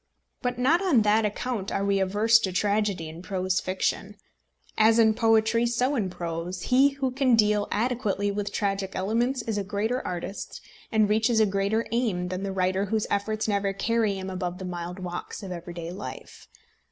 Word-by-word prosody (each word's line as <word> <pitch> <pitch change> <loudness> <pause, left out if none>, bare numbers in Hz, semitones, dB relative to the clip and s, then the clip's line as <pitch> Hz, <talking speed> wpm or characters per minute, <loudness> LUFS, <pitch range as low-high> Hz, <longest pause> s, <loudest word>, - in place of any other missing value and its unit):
But 245 -1 -2
not 290 +9 +3
on 305 - +3
that 215 +1 +3
account 210 -1 -3
are 200 - -1
we 200 -1 +2
averse 210 +4 +4
to 195 -4 -2
tragedy 200 -3 0
in 160 +2 -9
prose 185 -1 -1
fiction. 195 +2 -2 0.6
As 220 +1 +5
in 220 -1 +5
poetry, 225 +1 +3
so 250 +4 +1
in 205 -7 0
prose, 175 +1 -5
he 270 +2 +4
who 265 -2 0
can 255 -2 +3
deal 210 -1 +3
adequately 210 -3 0
with 205 0 -3
tragic 195 -2 -2
elements 235 +6 0
is 220 -2 -2
a - - -2
greater 215 +5 -1
artist 180 +3 -5 0.3
and 215 -2 +3
reaches 220 +2 +2
a 220 - +5
higher 200 +3 0
aim 210 -7 0
than 185 +1 -3
the 195 0 -3
writer 190 +1 0
whose 215 +1 -1
efforts 215 +2 -1
never 200 -1 0
carry 220 0 0
him 190 0 -5
above 180 -1 -3
the 190 - -7
mild 175 0 -5
walks 180 +2 -6
of 190 - -6
everyday 170 -1 -6
life. 195 +3 -9
205 Hz, 180 wpm, -26 LUFS, 190-225 Hz, 0.6 s, As